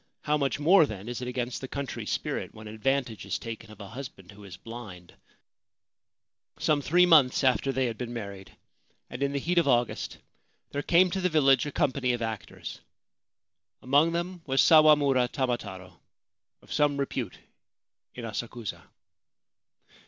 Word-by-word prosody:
How 150 Hz, -, +1 dB
much 140 Hz, -1 st, 0 dB
more, 160 Hz, +1 st, +6 dB
then, 105 Hz, -2 st, -8 dB
is 120 Hz, +1 st, -5 dB
it 125 Hz, -, -4 dB
against 125 Hz, 0 st, -3 dB
the 130 Hz, -, -5 dB
country's 140 Hz, 0 st, -5 dB
spirit -, -, -3 dB
when 110 Hz, 0 st, -10 dB
advantage 115 Hz, +1 st, -1 dB
is -, -, -2 dB
taken 115 Hz, -1 st, -8 dB
of 110 Hz, -, -14 dB
a 100 Hz, -2 st, -9 dB
husband 110 Hz, -7 st, -9 dB
who 100 Hz, +1 st, -14 dB
is 90 Hz, -2 st, -10 dB
blind? 105 Hz, -7 st, -10 dB, 1.4 s
Some 150 Hz, -2 st, +1 dB
three 175 Hz, +6 st, +4 dB
months 150 Hz, -8 st, +5 dB
after 130 Hz, +1 st, +2 dB
they 130 Hz, 0 st, 0 dB
had 115 Hz, -2 st, -4 dB
been 120 Hz, -2 st, -4 dB
married, 100 Hz, -5 st, -8 dB, 0.5 s
and 120 Hz, -, -7 dB
in 140 Hz, 0 st, +1 dB
the 140 Hz, -, -2 dB
heat 170 Hz, +5 st, +1 dB
of 170 Hz, -, +1 dB
August, 120 Hz, -2 st, 0 dB, 0.5 s
there 145 Hz, -, -2 dB
came 180 Hz, +4 st, +4 dB
to 190 Hz, -, -2 dB
the 185 Hz, -, +2 dB
village 140 Hz, -4 st, +4 dB
a -, -, -4 dB
company 135 Hz, -5 st, 0 dB
of 120 Hz, -, -3 dB
actors. 110 Hz, -2 st, -6 dB, 1.0 s
Among 145 Hz, +6 st, +4 dB
them 175 Hz, +1 st, -3 dB
was 135 Hz, 0 st, +1 dB
Sawamura 145 Hz, -5 st, +6 dB
Tamataro, 110 Hz, -9 st, -4 dB, 0.6 s
of -, -, -8 dB
some 145 Hz, -2 st, +2 dB
repute 130 Hz, -7 st, -3 dB, 0.8 s
in 120 Hz, -, -6 dB
Asakusa. 115 Hz, 0 st, -5 dB
130 Hz, 160 wpm, -28 LUFS, 115-145 Hz, 1.4 s, more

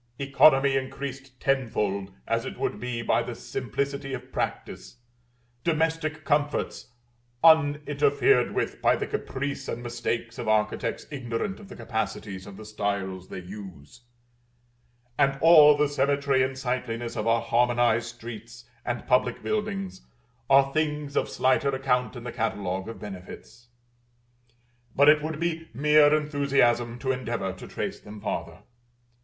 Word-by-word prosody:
Economy 140 Hz, 0 st, +4 dB
increased 135 Hz, -1 st, -5 dB
tenfold, 105 Hz, -7 st, 0 dB, 0.2 s
as -, -, 0 dB
it -, -, -6 dB
would -, -, -2 dB
be 125 Hz, -1 st, -4 dB
by 115 Hz, +1 st, +2 dB
the 120 Hz, 0 st, -5 dB
simplicity 135 Hz, +4 st, -3 dB
of 125 Hz, -, -11 dB
practice; -, -, -4 dB, 0.7 s
domestic 160 Hz, -1 st, 0 dB
comforts 145 Hz, -3 st, -1 dB, 0.5 s
uninterfered 145 Hz, -5 st, +4 dB
with -, -, -2 dB
by -, -, +4 dB
the -, -, -2 dB
caprice 140 Hz, +1 st, -4 dB
and 120 Hz, -, -4 dB
mistakes 115 Hz, -1 st, -3 dB
of 115 Hz, -, -4 dB
architects 105 Hz, -1 st, 0 dB
ignorant 130 Hz, -, -3 dB
of 200 Hz, -2 st, -13 dB
the 200 Hz, -, -9 dB
capacities 100 Hz, -4 st, -4 dB
of 100 Hz, -1 st, -10 dB
the 110 Hz, -, -10 dB
styles 100 Hz, -3 st, -3 dB
they 95 Hz, -, -6 dB
use, 95 Hz, -, -11 dB, 1.2 s
and 135 Hz, -1 st, +3 dB
all 150 Hz, -2 st, +8 dB
the 150 Hz, 0 st, +3 dB
symmetry 140 Hz, -1 st, +1 dB
and 130 Hz, 0 st, -1 dB
sightliness 125 Hz, -2 st, -3 dB
of 105 Hz, -, -2 dB
our 115 Hz, 0 st, +3 dB
harmonized 120 Hz, -1 st, +2 dB
streets 120 Hz, 0 st, -9 dB, 0.2 s
and 120 Hz, 0 st, -3 dB
public 125 Hz, -1 st, +1 dB
buildings, 210 Hz, -3 st, -3 dB, 0.5 s
are 135 Hz, 0 st, +5 dB
things 150 Hz, -2 st, -1 dB
of -, -, +1 dB
slighter 130 Hz, +2 st, +2 dB
account 130 Hz, -2 st, 0 dB
in 120 Hz, -, -8 dB
the 120 Hz, -, -5 dB
catalogue 100 Hz, -5 st, -2 dB
of 115 Hz, -, -7 dB
benefits. 105 Hz, +4 st, -10 dB, 1.3 s
But 140 Hz, +2 st, +6 dB
it 150 Hz, 0 st, +6 dB
would 155 Hz, 0 st, -4 dB
be 165 Hz, -1 st, -2 dB
mere 150 Hz, +2 st, +5 dB
enthusiasm 140 Hz, -6 st, +2 dB
to 130 Hz, +2 st, -1 dB
endeavor 120 Hz, -7 st, -3 dB
to 95 Hz, -, -11 dB
trace -, -, -4 dB
them 105 Hz, 0 st, -11 dB
farther. -, -, -5 dB
130 Hz, 140 wpm, -26 LUFS, 115-145 Hz, 1.3 s, all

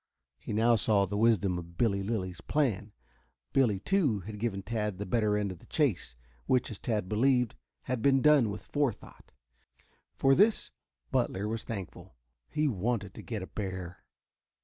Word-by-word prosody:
He -, -, -7 dB
now 115 Hz, +2 st, +4 dB
saw 100 Hz, -2 st, +3 dB
the 100 Hz, +2 st, -4 dB
wisdom 100 Hz, -5 st, +2 dB
of 85 Hz, 0 st, -11 dB
Billy 100 Hz, -5 st, +2 dB
Lilly's 95 Hz, -5 st, -3 dB
plan. 110 Hz, -, 0 dB, 0.6 s
Billy, 115 Hz, -8 st, +3 dB
too, 145 Hz, -, +1 dB
had 105 Hz, +3 st, -8 dB
given 100 Hz, -4 st, -2 dB
Tad 105 Hz, -2 st, -2 dB
the 100 Hz, -, -4 dB
better 105 Hz, +1 st, +1 dB
end 100 Hz, -2 st, -1 dB
of 90 Hz, -, -9 dB
the -, -, -19 dB
chase, 115 Hz, -, 0 dB, 0.3 s
which, 130 Hz, -3 st, +2 dB
as 105 Hz, -, -7 dB
Tad 105 Hz, -6 st, -1 dB
believed, 125 Hz, +3 st, +2 dB, 0.3 s
had 130 Hz, -2 st, -2 dB
been 135 Hz, +1 st, +4 dB
done 145 Hz, -5 st, +5 dB
with 105 Hz, +1 st, -6 dB
fore 145 Hz, -4 st, +1 dB
thought. -, -, -17 dB, 0.8 s
For 135 Hz, 0 st, +4 dB
this 210 Hz, +8 st, +3 dB, 0.4 s
Butler 100 Hz, +3 st, 0 dB
was 110 Hz, +1 st, -3 dB
thankful. 95 Hz, -, -7 dB, 0.3 s
He 155 Hz, 0 st, +1 dB
wanted 105 Hz, -3 st, -1 dB
to -, -, -9 dB
get 110 Hz, -5 st, -5 dB
a -, -, -4 dB
bear. 95 Hz, -3 st, -6 dB
105 Hz, 170 wpm, -30 LUFS, 95-125 Hz, 0.8 s, done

